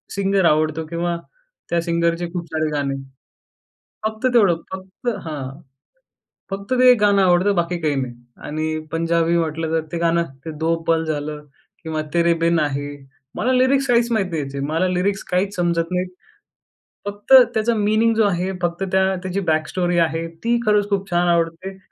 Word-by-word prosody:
Singer 195 Hz, -1 st, +1 dB
आवडतो 155 Hz, 0 st, +2 dB
किंवा 170 Hz, +2 st, -2 dB, 0.5 s
त्या 170 Hz, 0 st, +1 dB
सिंगरचे 170 Hz, 0 st, 0 dB
खूप 175 Hz, -2 st, -3 dB
सारे 155 Hz, 0 st, 0 dB
गाणे. 140 Hz, -2 st, -1 dB, 1.1 s
फक्त 220 Hz, +3 st, -2 dB
तेवढं 200 Hz, -8 st, +5 dB, 0.2 s
फक्त 190 Hz, +5 st, -7 dB, 0.2 s
हां. 140 Hz, -3 st, -6 dB, 0.9 s
फक्त 200 Hz, +4 st, -5 dB
ते 255 Hz, 0 st, +8 dB
एक 250 Hz, -, +5 dB
गाणं 200 Hz, -1 st, +4 dB
आवडतं 185 Hz, +2 st, +3 dB
बाकी 175 Hz, -1 st, 0 dB
काही 155 Hz, -3 st, 0 dB
नाही. 125 Hz, -2 st, -4 dB, 0.2 s
आणि 155 Hz, +1 st, -3 dB
पंजाबी 165 Hz, +1 st, +1 dB
म्हटलं, 160 Hz, 0 st, -2 dB
तर 160 Hz, -1 st, 0 dB
ते 170 Hz, -, -2 dB
गाणं 170 Hz, 0 st, +2 dB, 0.2 s
ते 165 Hz, -, -5 dB
दो 165 Hz, +1 st, +1 dB
पल 165 Hz, -1 st, +2 dB
झालं 150 Hz, -1 st, -4 dB, 0.4 s
किंवा 160 Hz, -1 st, -3 dB
तेरे 170 Hz, 0 st, +3 dB
बिन 170 Hz, 0 st, +3 dB
आहे. 145 Hz, -1 st, -2 dB, 0.5 s
मला 250 Hz, +4 st, +1 dB
लिरिक्स 260 Hz, +2 st, +3 dB
काहीच 240 Hz, -1 st, +3 dB
माहीत 205 Hz, -4 st, +1 dB
नाही 160 Hz, -2 st, -1 dB
ह्याचे, 140 Hz, 0 st, -5 dB
मला 165 Hz, +5 st, 0 dB
लिरिक्स 185 Hz, +2 st, 0 dB
काहीच 195 Hz, +3 st, 0 dB
समजत 170 Hz, -1 st, 0 dB
नाहीत. 180 Hz, 0 st, -1 dB, 1.0 s
फक्त 205 Hz, +4 st, -4 dB, 0.2 s
त्याचा 225 Hz, +2 st, +1 dB
मीनिंग 215 Hz, +2 st, +2 dB
जो 220 Hz, -, +4 dB
आहे, 185 Hz, -1 st, 0 dB
फक्त 175 Hz, +2 st, -1 dB
त्या 190 Hz, 0 st, +3 dB
त्याची 185 Hz, +1 st, -2 dB
बॅकस्टोरी 175 Hz, +3 st, 0 dB
आहे. 165 Hz, 0 st, +1 dB, 0.2 s
ती 235 Hz, +1 st, +2 dB
खरंच 210 Hz, -1 st, +3 dB
खूप 195 Hz, -1 st, -1 dB
छान 175 Hz, 0 st, +2 dB
आवडते. 170 Hz, +3 st, -1 dB
175 Hz, 165 wpm, -21 LUFS, 160-195 Hz, 1.1 s, ते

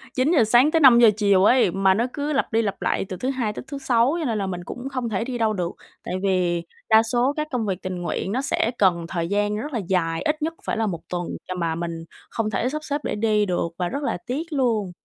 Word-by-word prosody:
9:00 270 Hz, +1 st, +3 dB
sáng 240 Hz, +7 st, +4 dB
tới 325 Hz, -, +3 dB
5:00 240 Hz, -5 st, +8 dB
chiều 200 Hz, -3 st, +4 dB
ấy, 245 Hz, -5 st, +4 dB
mà 195 Hz, +1 st, +3 dB
nó 225 Hz, +5 st, +1 dB
cứ 295 Hz, 0 st, -2 dB
lặp 275 Hz, -, 0 dB
đi 225 Hz, 0 st, +2 dB
lặp 200 Hz, -3 st, -3 dB
lại -, -, 0 dB
từ 185 Hz, -, -5 dB
thứ 255 Hz, +8 st, -2 dB
Hai 245 Hz, -6 st, -1 dB
tới -, -, -7 dB
thứ 280 Hz, -, -6 dB
Sáu. 250 Hz, +1 st, +2 dB
Cho 325 Hz, -, -2 dB
nên 225 Hz, -5 st, -1 dB
là 195 Hz, -1 st, -2 dB
mình 180 Hz, -1 st, -4 dB
cũng 250 Hz, +6 st, -6 dB
không 255 Hz, -3 st, -2 dB
thể 205 Hz, 0 st, -1 dB
đi 250 Hz, 0 st, -4 dB
đâu 220 Hz, -2 st, +1 dB
được, 180 Hz, -3 st, -2 dB, 0.3 s
tại -, -, -5 dB
vì 180 Hz, -3 st, +1 dB, 0.3 s
đa 220 Hz, 0 st, +6 dB
số 245 Hz, +4 st, +1 dB
các 305 Hz, 0 st, -1 dB
công 245 Hz, -4 st, -1 dB
việc 190 Hz, -2 st, -3 dB
tình 185 Hz, -1 st, -4 dB
nguyện 175 Hz, +2 st, -3 dB
nó 250 Hz, +5 st, 0 dB
sẽ 240 Hz, -4 st, 0 dB
cần 175 Hz, -4 st, +2 dB
thời 170 Hz, -1 st, -2 dB
gian 205 Hz, +2 st, 0 dB
rất 285 Hz, +6 st, -5 dB
là 235 Hz, -, 0 dB
dài, 165 Hz, -3 st, 0 dB
ít 305 Hz, +1 st, -1 dB
nhất 320 Hz, +2 st, -1 dB
phải -, -, -2 dB
là 225 Hz, -, +1 dB
1 170 Hz, -4 st, -3 dB
tuần 175 Hz, -1 st, -3 dB, 0.2 s
chà 185 Hz, -, -3 dB
mà 165 Hz, -2 st, -1 dB
mình 165 Hz, -1 st, -5 dB, 0.2 s
không 220 Hz, -2 st, -2 dB
thể 225 Hz, +4 st, -1 dB
sắp 305 Hz, +2 st, -5 dB
xếp 290 Hz, 0 st, -2 dB
để -, -, -2 dB
đi 210 Hz, -1 st, +2 dB
được 180 Hz, -3 st, -1 dB
và 180 Hz, -, 0 dB
rất 280 Hz, +3 st, -4 dB
là 280 Hz, -, -1 dB
tiếc 260 Hz, +6 st, -2 dB
luôn. 230 Hz, -9 st, 0 dB
220 Hz, 265 wpm, -23 LUFS, 185-255 Hz, 0.3 s, 5:00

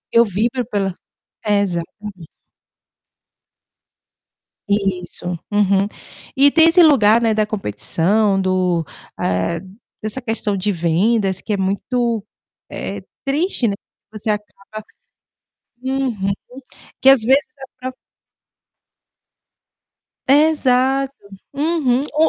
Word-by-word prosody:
eu 230 Hz, -, +8 dB
vibro 230 Hz, +5 st, -1 dB
pela 195 Hz, -5 st, -1 dB, 0.5 s
exatamente. 200 Hz, -2 st, -2 dB, 2.4 s
Isso. 195 Hz, -4 st, -2 dB, 0.2 s
Uhum. 200 Hz, -1 st, +2 dB, 0.5 s
E 280 Hz, +2 st, +6 dB
tem 325 Hz, +2 st, +6 dB
esse 350 Hz, +2 st, +6 dB
lugar, 235 Hz, -8 st, +5 dB
né, 225 Hz, -1 st, +3 dB
da 215 Hz, -1 st, +1 dB
competição, 195 Hz, -, 0 dB
do 185 Hz, -3 st, +1 dB, 0.3 s
ah, 95 Hz, -, -1 dB, 0.4 s
dessa 215 Hz, +4 st, -2 dB
questão 225 Hz, -4 st, -2 dB
de 200 Hz, +3 st, 0 dB
vendas 190 Hz, +3 st, +1 dB
que 215 Hz, -, -2 dB
é -, -, +1 dB
muito, 225 Hz, +4 st, -1 dB, 0.5 s
eh, -, -, -5 dB, 0.2 s
triste, 280 Hz, -1 st, 0 dB
né, 200 Hz, -, -1 dB, 0.4 s
você 215 Hz, 0 st, -3 dB
acaba 210 Hz, 0 st, -6 dB, 1.0 s
Uhum. 255 Hz, -7 st, -1 dB, 0.7 s
Que 265 Hz, -, +7 dB
às 270 Hz, -3 st, +7 dB
vezes 265 Hz, +5 st, +4 dB
a 270 Hz, -, -9 dB, 0.2 s
própria -, -, -11 dB, 2.3 s
Exato. 270 Hz, -2 st, +3 dB, 0.4 s
Uhum. 280 Hz, -4 st, +1 dB
O 315 Hz, +2 st, +4 dB
215 Hz, 95 wpm, -19 LUFS, 195-265 Hz, 2.4 s, eu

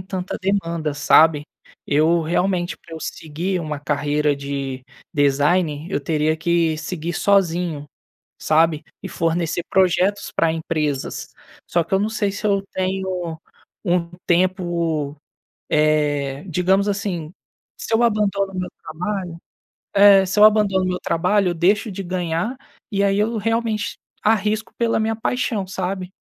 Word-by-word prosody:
tanta 185 Hz, 0 st, -5 dB
demanda, 170 Hz, -6 st, -1 dB
sabe. 150 Hz, 0 st, +5 dB, 0.4 s
Eu 160 Hz, +3 st, +3 dB
realmente, 175 Hz, +2 st, 0 dB
pra 165 Hz, -, -12 dB
eu 160 Hz, -, -6 dB
seguir 170 Hz, +5 st, -3 dB
uma 150 Hz, -3 st, -4 dB
carreira 145 Hz, 0 st, 0 dB
de 140 Hz, -2 st, -5 dB, 0.3 s
design, 145 Hz, +2 st, +1 dB
eu 170 Hz, -, 0 dB
teria 155 Hz, +1 st, 0 dB
que 165 Hz, -1 st, +1 dB
seguir 165 Hz, +1 st, -4 dB
sozinho, 175 Hz, -6 st, +1 dB, 0.5 s
sabe, 160 Hz, 0 st, +2 dB, 0.2 s
e -, -, -5 dB
fornecer 165 Hz, 0 st, -1 dB
projetos 190 Hz, +2 st, +2 dB
pra 165 Hz, -1 st, +2 dB
empresas. 155 Hz, -4 st, -3 dB, 0.4 s
Só 170 Hz, -, +1 dB
que 165 Hz, -, -22 dB
eu 195 Hz, -, +4 dB
não 210 Hz, -, +1 dB
sei 205 Hz, -3 st, 0 dB
se 205 Hz, +2 st, -3 dB
eu 200 Hz, -1 st, +2 dB
tenho 185 Hz, -3 st, -2 dB, 0.5 s
um 175 Hz, -2 st, +1 dB, 0.2 s
tempo, 170 Hz, -5 st, 0 dB, 0.5 s
eh, 150 Hz, -2 st, +1 dB
digamos 190 Hz, +4 st, +2 dB
assim, 190 Hz, -6 st, -3 dB, 0.5 s
se -, -, -5 dB
eu 240 Hz, -, +3 dB
abandono 200 Hz, -3 st, +1 dB
o 185 Hz, -, -3 dB
meu 180 Hz, -, -3 dB
trabalho 180 Hz, 0 st, -4 dB, 0.6 s
É, 200 Hz, -1 st, +7 dB
se 190 Hz, +3 st, -1 dB
eu 210 Hz, -, +8 dB
abandono 210 Hz, -3 st, +4 dB
o -, -, 0 dB
meu 180 Hz, 0 st, -2 dB
trabalho, 185 Hz, +3 st, +1 dB
eu -, -, -1 dB
deixo 205 Hz, +6 st, +2 dB
de 195 Hz, -, -5 dB
ganhar 180 Hz, +6 st, -2 dB, 0.3 s
e 200 Hz, 0 st, +1 dB
aí 195 Hz, 0 st, +2 dB
eu 220 Hz, +2 st, 0 dB
realmente 225 Hz, 0 st, -1 dB, 0.3 s
arrisco 215 Hz, 0 st, +1 dB
pela 230 Hz, -1 st, +1 dB
minha 225 Hz, +1 st, 0 dB
paixão, 225 Hz, -4 st, -1 dB
sabe, 185 Hz, -1 st, -3 dB
175 Hz, 140 wpm, -21 LUFS, 155-200 Hz, 0.6 s, eu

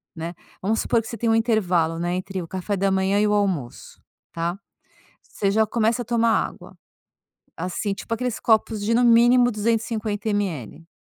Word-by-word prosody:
né, 165 Hz, +2 st, -5 dB, 0.3 s
vamos 215 Hz, +4 st, 0 dB
supor 230 Hz, -, +1 dB
que 220 Hz, -, -11 dB
você 230 Hz, -, -6 dB
tem 230 Hz, -, 0 dB
um 225 Hz, -, +4 dB
intervalo, 180 Hz, -8 st, +1 dB
não 175 Hz, 0 st, -1 dB
é, 180 Hz, -, -1 dB
entre 185 Hz, 0 st, -4 dB
o 165 Hz, -, -7 dB
café 190 Hz, +2 st, -3 dB
da 195 Hz, 0 st, +1 dB
manhã 190 Hz, +1 st, +1 dB
e 210 Hz, -, +3 dB
o 210 Hz, -, +1 dB
almoço, 185 Hz, -12 st, -2 dB, 0.3 s
tá. 170 Hz, +3 st, -3 dB, 0.6 s
Você 200 Hz, -, -2 dB
já 220 Hz, +1 st, +3 dB
começa 230 Hz, +2 st, +1 dB
a -, -, -18 dB
tomar 230 Hz, -1 st, +2 dB, 0.2 s
água, -, -, -14 dB, 0.8 s
assim, 185 Hz, +3 st, -2 dB
tipo 225 Hz, -, -5 dB
aqueles 250 Hz, 0 st, -2 dB
copos 220 Hz, -1 st, +2 dB
de, 225 Hz, +2 st, +1 dB
no 245 Hz, +1 st, +3 dB
mínimo, 240 Hz, +1 st, +5 dB
250 220 Hz, -1 st, -1 dB
ml. 165 Hz, -, -3 dB
210 Hz, 185 wpm, -23 LUFS, 185-230 Hz, 0.8 s, mínimo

